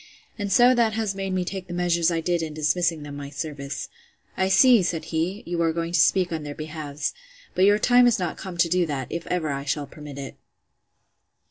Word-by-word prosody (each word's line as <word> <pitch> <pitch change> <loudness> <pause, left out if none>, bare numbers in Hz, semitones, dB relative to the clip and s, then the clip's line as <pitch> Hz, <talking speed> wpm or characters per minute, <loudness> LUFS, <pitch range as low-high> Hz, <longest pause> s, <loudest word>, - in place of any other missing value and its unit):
and 205 -2 -4
so 245 +5 +6
that 235 -3 +2
has 220 -3 -1
made 195 0 -4
me 185 -1 -1
take 190 0 -5
the 175 - -6
measures 175 -1 +2
I 165 -1 -1
did 175 0 0
in 155 -2 -5
dismissing 155 +1 0
them 145 -1 -8
my 140 -1 -7
service.—I 145 +5 -6
see, 230 +4 +6
said 170 -2 -2
he, 175 +6 -2
you 170 0 -2
are 165 -1 +2
going 165 +1 -3
to 175 - +2
speak 180 +3 +3
on 160 -1 -2
their 145 -1 -7
behalfs; 155 -2 -4 0.4
but 185 - +3
your 205 +1 +5
time 245 +2 +5
is 240 - +3
not 180 -2 -2
come 185 -2 -8
to 170 - +3
do 175 0 +1
that, 135 -4 -4
if 170 - -5
ever 165 -4 -1
I 140 0 -3
shall 145 +1 -2
permit 150 -2 -11
it. 140 -1 -7
170 Hz, 220 wpm, -24 LUFS, 150-190 Hz, 0.4 s, so